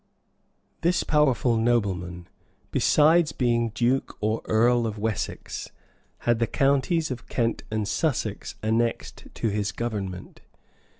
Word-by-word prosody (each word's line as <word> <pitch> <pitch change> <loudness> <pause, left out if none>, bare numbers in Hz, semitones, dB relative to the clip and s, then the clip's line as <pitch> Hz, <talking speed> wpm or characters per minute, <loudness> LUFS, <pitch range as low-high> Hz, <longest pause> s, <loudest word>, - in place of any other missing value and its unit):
] - - -44
This 175 -2 +2
powerful 135 -6 +2
nobleman, 95 -7 0 0.4
besides 155 +1 +4
being 120 -2 +1
duke 120 +4 0
or 110 +1 0
earl 120 +1 +3
of 110 -1 -5
Wessex, 105 -2 -3 0.6
had 120 -1 +3
the 115 - +1
counties 140 +4 +1
of 125 -2 -7
Kent 115 -2 0
and 110 -2 -2
Sussex 115 -5 -2
annexed 115 +2 -1
to 115 - -1
his 100 0 -1
government. 100 -6 -5
115 Hz, 120 wpm, -25 LUFS, 110-130 Hz, 0.6 s, besides